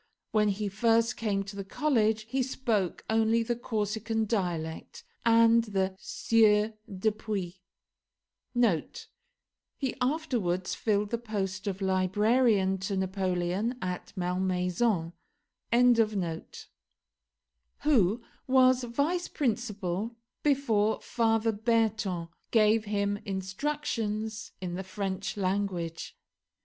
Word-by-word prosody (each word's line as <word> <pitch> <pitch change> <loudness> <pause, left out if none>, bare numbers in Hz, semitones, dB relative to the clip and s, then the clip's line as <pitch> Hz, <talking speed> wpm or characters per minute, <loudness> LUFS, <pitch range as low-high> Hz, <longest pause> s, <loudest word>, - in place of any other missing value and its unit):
When 215 -2 +3
he 205 +1 -1
first 225 +3 +2
came 200 -3 -1
to 200 +1 -9
the 200 - -4
college 220 -1 +1
he 260 +5 -1
spoke 230 -8 -1
only 225 +1 +2
the 240 +1 -1
Corsican 220 -1 -1
dialect, 175 - -3 0.2
and 230 0 +5
the 190 -3 -1
Sieur 215 -1 +3 0.2
Dupuis, 195 -2 -2 2.2
[He 265 -3 -2
afterwards 245 - 0
filled 210 -2 0
the 235 - 0
post 200 -4 -3
of 195 0 -2
librarian 195 +1 +2
to 190 +1 -2
Napoleon 190 +4 -1
at 180 -1 -4
Malmaison.] 180 0 0 2.7
who 230 -6 +3 0.2
was 255 -1 +5
vice 285 +9 0
principal 220 - -2 0.3
before 230 -7 +2
Father 225 -1 +1
Berton, 215 -5 0 0.2
gave 220 -1 +4
him 205 -1 0
instructions 215 +2 -3
in 180 -2 -4
the 190 +2 -4
French 190 +1 -4
language. 185 -4 -2
210 Hz, 95 wpm, -29 LUFS, 190-230 Hz, 2.7 s, and